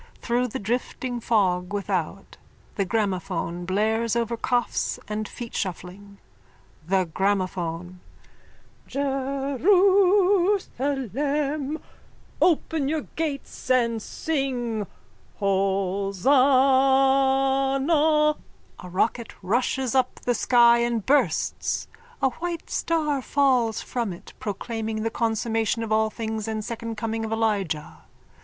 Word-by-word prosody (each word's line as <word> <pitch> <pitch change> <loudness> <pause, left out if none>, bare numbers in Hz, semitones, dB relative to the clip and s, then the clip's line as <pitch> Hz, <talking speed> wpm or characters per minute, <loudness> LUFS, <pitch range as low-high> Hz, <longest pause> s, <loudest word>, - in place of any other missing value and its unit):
Through 245 +1 0
the 225 - -5
drifting 245 +3 -3
fog 185 -6 +1
without 195 -2 -3 0.4
the 200 - -1
gramophone 185 -4 -2
blares 220 +4 0
over 235 0 0
coughs 240 -1 -1
and 210 0 -3
feetshuffling.)_ 200 -3 -6 0.7
THE 190 0 +2
GRAMOPHONE: 180 -1 -2 0.9
Jerusalem! 290 - +1 0.6
Open 320 -4 +2
your 315 0 0
gates 305 -4 -4
and 235 -3 +2
sing 245 - -2 0.5
Hosanna... 195 +3 +1 2.5
_(A 180 - -9
rocket 225 +5 -1
rushes 245 +5 0
up 260 -1 +2
the 245 - +1
sky 235 0 +5
and 235 -3 0
bursts. 290 +2 +1 0.4
A 265 - +5
white 340 +2 -5
star 300 -4 0
falls 255 -5 +2
from 235 -6 -3
it, 170 - -13
proclaiming 220 +1 -4
the 225 - -1
consummation 225 0 0
of 220 - -5
all 220 0 +3
things 220 -1 -4
and 215 -1 -3
second 230 -1 -5
coming 225 0 -2
of 220 - -4
Elijah. 205 -9 -1
230 Hz, 95 wpm, -25 LUFS, 200-270 Hz, 2.5 s, sky